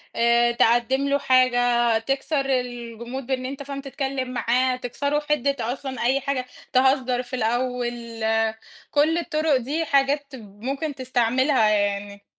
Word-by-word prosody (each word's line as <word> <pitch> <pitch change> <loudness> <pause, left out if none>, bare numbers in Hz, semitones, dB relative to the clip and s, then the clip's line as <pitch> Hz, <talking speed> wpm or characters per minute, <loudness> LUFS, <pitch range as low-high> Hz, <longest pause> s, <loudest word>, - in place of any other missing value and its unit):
آآ، 235 0 +3
تقدّم 240 +4 +2
له 280 0 +2
حاجة 245 -3 +3
تكسر 275 +4 -1
الجمود 245 0 -3
بإن 260 -1 -2
أنت 275 +2 -5
فاهم 275 0 -6
تتكلم 270 -2 -3
معاه، 255 +1 +1
تكسروا 280 +4 -2
حِدّة 280 -2 +1 0.2
أصلًا 265 -2 -6
أي 265 +3 +2
حاجة، 270 -1 -2 0.3
تهزر 255 -1 +2
في 245 +1 -6
الأول، 240 -1 -2 0.7
كُلّ 310 +3 +3
الطُرق 310 -4 +1
دي 290 +7 -2
حاجات 280 +1 +2
ممكن 260 +8 -5
تستعملها 255 -1 +2
يعني. 200 -1 -1
255 Hz, 125 wpm, -24 LUFS, 240-275 Hz, 0.7 s, آآ